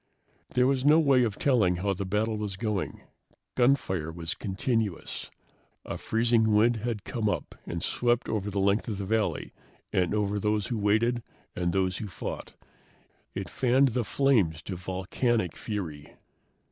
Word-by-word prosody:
There 125 - +5
was 130 -1 +2
no 150 +3 +6
way 135 -5 +4
of 110 -4 -1
telling 115 -10 +3
how 100 +3 0
the 95 +1 -4
battle 110 +3 0
was 105 -3 -4
going. 105 -2 -2 0.5
Gunfire 110 - +2
was 85 +1 -4
continuous. 105 -1 -2 0.6
A - - -5
freezing 115 -1 +2
wind 115 +3 +4
had 110 -2 -3
come 110 -3 -1
up - - -3
and 85 0 -4
swept 120 0 +1
over 105 -2 -1
the 100 0 -2
length 100 +2 +2
of 105 -4 -3
the 100 - -3
valley 110 +1 -1 0.4
and 90 +2 +2
over 105 -1 0
those 105 0 0
who 120 - -1
waited 110 +4 +2 0.3
and 90 -1 0
those 95 -2 0
who 105 - -4
fought. 95 - -6 0.8
It 95 -1 -3
fanned 130 +6 +3
the 120 0 0
flames 105 - +2
to 95 - -5
volcanic 95 +3 -1
fury. 80 -9 -5
105 Hz, 160 wpm, -28 LUFS, 95-120 Hz, 0.8 s, no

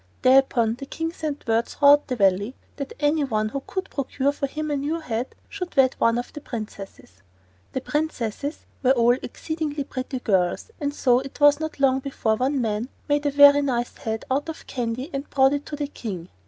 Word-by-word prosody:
Thereupon 255 -3 +4
the 275 - -7
King 325 +3 -3
sent 305 -4 -5
word 225 +1 +2
throughout 285 +1 +5
the 255 - -2
Valley 200 +3 +2 0.2
that 280 -2 -5
any 295 +1 +2
one 215 -5 0
who 275 +4 -4
could 380 0 -3
procure 275 0 0
for 285 -1 -3
him 305 +2 -4
a - - +1
new 295 +4 -1
head 245 -5 -4
should 360 -6 -6
wed 260 -1 +5
one 230 0 +3
of 245 - -5
the 295 - -7
princesses. 200 - -8 0.5
The 260 - -2
princesses 290 -2 -3 0.2
were 260 0 +5
all 240 -1 +4
exceedingly 310 +1 -4
pretty 260 0 -5
girls, 190 - 0
and 285 -2 -1
so 250 -4 +3
it 270 +2 -9
was 290 0 +6
not 315 -2 -5
long 265 -1 +3
before 260 -5 -1
one 265 +4 0
man 225 +1 -1 0.2
made 290 0 +1
a - - +3
very 285 0 +7
nice 245 -4 -1
head 220 0 -4
out 285 +4 0
of 320 - -7
candy 250 +4 -3
and 275 +1 -4
brought 270 0 +4
it 285 0 -3
to 295 - -4
the 295 0 -2
King. 195 -11 -6
270 Hz, 200 wpm, -24 LUFS, 235-290 Hz, 0.5 s, very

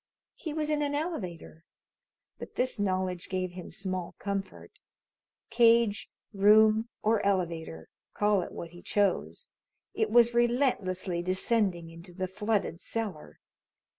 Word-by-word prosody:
He 315 - -6
was 305 0 -2
in 300 -1 +1
an 290 0 -1
elevator, 185 - -5 0.8
but - - -9
this 255 -3 -1
knowledge 185 -2 -1
gave 185 -2 -2
him 180 0 -9
small 185 -3 -5
comfort. 195 -1 -5 0.7
Cage, 230 -3 +4 0.2
room, 215 +3 +5
or 220 0 +2
elevator 170 - -1 0.3
call 205 -2 +2
it - - -6
what 170 - -7
he 175 0 -13
chose 205 -2 -1 0.4
it 440 - 0
was 240 0 +5
relentlessly 235 -8 +1
descending 185 -2 0
into 170 +2 -12
the 185 0 -2
flooded 205 -2 -1
cellar. 210 -9 -5
200 Hz, 125 wpm, -29 LUFS, 180-230 Hz, 0.8 s, room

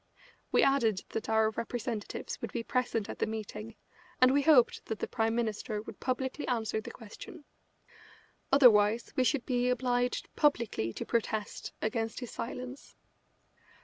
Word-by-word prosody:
We - - +4
added 230 -8 +3
that 220 - -4
our 220 0 +3
representatives 230 -1 -4
would - - -4
be 235 - -3
present 240 -4 -1
at - - -7
the - - +1
meeting, 220 0 -6 0.4
and 255 +1 +6
we 285 - +4
hoped 280 -5 +5
that 220 - -3
the - - -3
Prime 225 0 0
Minister 220 -2 -2
would 210 - -9
publicly 260 +2 -2
answer 220 -3 -1
the - - -8
question. 290 - -11 1.1
Otherwise 230 -5 +5
we 260 - +3
should 260 0 +1
be 250 -1 +1
obliged 245 0 0
publicly 235 - +1
to - - -5
protest 220 -2 -2
against 225 +1 -1
his 245 -2 -7
silence. 255 +3 -7
235 Hz, 145 wpm, -31 LUFS, 220-255 Hz, 1.1 s, and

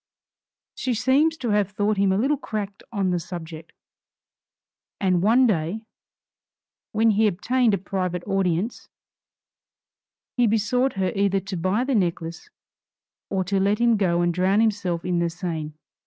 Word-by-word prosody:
She 255 -2 -2
seems 290 +7 +2
to 245 -6 -3
have 205 -2 +2
thought 205 +1 0
him 195 -1 +3
a 190 - +2
little 270 +8 +2
cracked 210 -7 -5
on 195 -4 0
the 175 - 0
subject; 165 -2 -8 1.3
and 185 -3 +2
one 235 +6 +4
day, 205 +1 -1 1.1
when 220 +1 +3
he 215 +1 +3
obtained 225 +3 +1
a - - -2
private 180 -2 -3
audience, 195 +1 -1 1.5
he 245 -1 +4
besought 235 +5 +1
her 190 -1 -1
either 195 -1 +2
to 195 +1 -6
buy 185 +7 0
the 270 +1 -1
necklace 170 -5 -2 0.8
or 190 -1 0
to 195 +2 0
let 200 +2 +2
him 235 0 +3
go 175 -4 +1
and 175 0 +1
drown 185 +4 +2
himself 195 -6 0
in 180 -1 0
the 170 0 +1
Seine. 165 -3 -5
195 Hz, 150 wpm, -24 LUFS, 180-220 Hz, 1.5 s, one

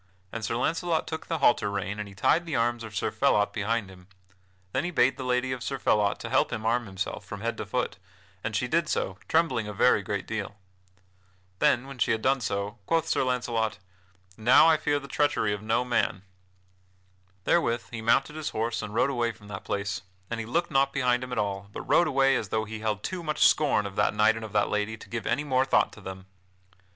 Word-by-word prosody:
And 115 - -5
Sir 115 - -1
Launcelot 165 +5 0
took 160 - -6
the 165 - -1
halter 120 -7 +3
rein 100 +1 -3
and 105 - -4
he 100 - -14
tied 170 - +2
the 155 - -2
arms 120 0 0
of 110 -2 -9
Sir - - -1
Phelot 105 0 +2
behind 110 0 -1
him. 90 -1 -16 0.6
Then 130 - 0
he 175 - -1
bade 130 -6 +3
the 135 - -6
lady 125 0 0
of 130 -2 -4
Sir 135 +2 -3
Phelot 105 -5 +2
to - - -5
help - - +3
him 110 - -4
arm 120 0 +1
himself 95 +1 -4
from 100 +2 -8
head 115 +1 -1
to - - -5
foot, - - -2 0.5
and - - -3
she - - 0
did - - +1
so, 95 0 -2
trembling 160 -10 +1
a 105 - -5
very - - +4
great - - -3
deal. - - -4 1.0
Then, 125 +1 +3
when 135 -2 -10
she - - +3
had 110 - -3
done 135 0 +2
so, 100 0 -3
quoth 165 -2 +1
Sir - - +1
Launcelot: 120 -3 -1 0.6
"Now 120 +7 +6
I 165 - +6
fear 150 -1 0
the 140 - -10
treachery 140 -7 +1
of 105 - -5
no 115 +3 0
man." 110 -6 0 1.2
Therewith 120 - +1
he 115 -2 -5
mounted 115 +6 +2
his 155 -1 -3
horse 115 +1 -2
and 105 0 -6
rode 135 +4 +3
away 120 -3 0
from 105 -2 -16
that 95 -2 -6
place 100 -2 -2 0.3
And 115 - -2
he 115 - -5
looked 170 +8 0
not 135 0 +2
behind 125 -2 +1
him 125 - -7
at 125 - -3
all, 100 -1 -2
but - - -6
rode 155 +6 +3
away 135 -2 +3
as 110 -5 -2
though 110 +1 0
he 110 0 -7
held 105 -1 -2
too 185 -2 -3
much 155 -2 +3
scorn 140 -9 +2
of 100 -1 -6
that 105 - +2
knight 110 +1 +4
and 115 - -6
of 110 -1 -8
that 105 -1 +2
lady 105 +1 -1
to - - -14
give 115 -2 -4
any 145 - +1
more 130 -3 +2
thought 135 - +2
to 105 - -13
them. 95 0 -8
115 Hz, 230 wpm, -27 LUFS, 105-135 Hz, 1.2 s, Now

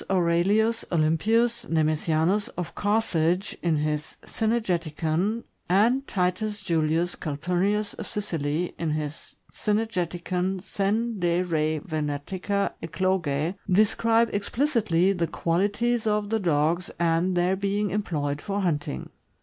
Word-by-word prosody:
Aurelius 195 +5 +2
Olympius 225 +9 +2
Neme 155 -1 +2
sianus 165 +7 +1
of 175 -2 -4
Carthage, 195 -3 +1
in 170 -2 +2
his 150 0 -2
" - - -39
Cynegeticon," 185 -2 -1 0.3
and 235 +9 +3
Titus 205 +3 -1
Julius 165 -1 +1
Calpurnius 180 +7 -1
of - - -7
Sicily, 165 -4 -2
in 165 - -1
his 150 0 -5 0.2
"Cynegeticon 185 -3 -1
sen 210 +3 -1
de 175 0 +2
re 155 -3 0
Vene 150 -4 -2
tica 200 +1 -1
Eclogse," 165 -3 0 0.2
describe 225 +3 +3
explicitly 205 - +1
the 170 -3 -1
qualities 210 +9 0
of 210 0 0
the 225 - +2
dogs, 170 0 +1
and 170 +2 +1
their 180 +2 +2
being 200 +1 -1
employed 150 -8 -2
for 200 0 -2
hunting. 145 - -2
180 Hz, 115 wpm, -26 LUFS, 165-210 Hz, 0.3 s, and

